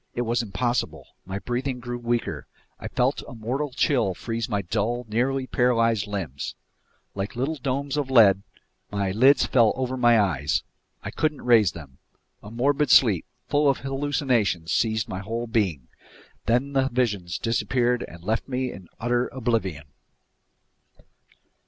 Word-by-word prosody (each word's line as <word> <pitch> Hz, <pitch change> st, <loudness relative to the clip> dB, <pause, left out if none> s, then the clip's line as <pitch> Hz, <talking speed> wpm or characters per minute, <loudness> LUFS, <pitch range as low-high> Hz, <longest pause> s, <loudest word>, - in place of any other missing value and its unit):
It 120 Hz, -, -1 dB
was 120 Hz, +1 st, 0 dB
impossible. 120 Hz, +3 st, -2 dB, 0.2 s
My 95 Hz, +1 st, -4 dB
breathing 125 Hz, +4 st, -3 dB
grew 120 Hz, 0 st, -5 dB
weaker. 120 Hz, 0 st, -2 dB, 0.3 s
I -, -, -6 dB
felt -, -, 0 dB
a -, -, -9 dB
mortal 130 Hz, +7 st, -2 dB
chill 125 Hz, -7 st, +1 dB
freeze 115 Hz, +4 st, -4 dB
my 100 Hz, -3 st, -1 dB
dull, 115 Hz, +7 st, -1 dB
nearly 130 Hz, +5 st, 0 dB
paralyzed 115 Hz, -4 st, +2 dB
limbs. 90 Hz, -10 st, -4 dB, 0.6 s
Like 100 Hz, +3 st, -4 dB
little 140 Hz, +6 st, -1 dB
domes 140 Hz, +2 st, -2 dB
of 140 Hz, -3 st, -1 dB
lead, 105 Hz, -7 st, +6 dB, 0.5 s
my 100 Hz, -2 st, -1 dB
lids 130 Hz, +6 st, +5 dB
fell 115 Hz, -4 st, +4 dB
over 130 Hz, 0 st, -2 dB
my 120 Hz, -2 st, +5 dB
eyes. 75 Hz, -8 st, +1 dB, 0.4 s
I -, -, -5 dB
couldn't 155 Hz, -2 st, -1 dB
raise 110 Hz, -8 st, +5 dB
them. 70 Hz, -6 st, -12 dB, 0.4 s
A 105 Hz, -, -10 dB
morbid 140 Hz, +5 st, +1 dB
sleep, 105 Hz, -11 st, +5 dB, 0.2 s
full 145 Hz, 0 st, +3 dB
of 135 Hz, -, +2 dB
hallucinations, 135 Hz, -, 0 dB
seized 110 Hz, -1 st, +1 dB
my 95 Hz, -, -5 dB
whole 115 Hz, +4 st, -4 dB
being. 95 Hz, -, -1 dB, 0.6 s
Then 125 Hz, +5 st, +1 dB
the 135 Hz, -1 st, +2 dB
visions 105 Hz, -9 st, -1 dB
disappeared 120 Hz, +1 st, 0 dB
and 85 Hz, 0 st, -13 dB
left 110 Hz, +4 st, -1 dB
me 130 Hz, -1 st, -2 dB
in 95 Hz, -3 st, -12 dB
utter 120 Hz, +1 st, +1 dB
oblivion. 110 Hz, -, -2 dB
120 Hz, 145 wpm, -25 LUFS, 100-130 Hz, 0.6 s, lead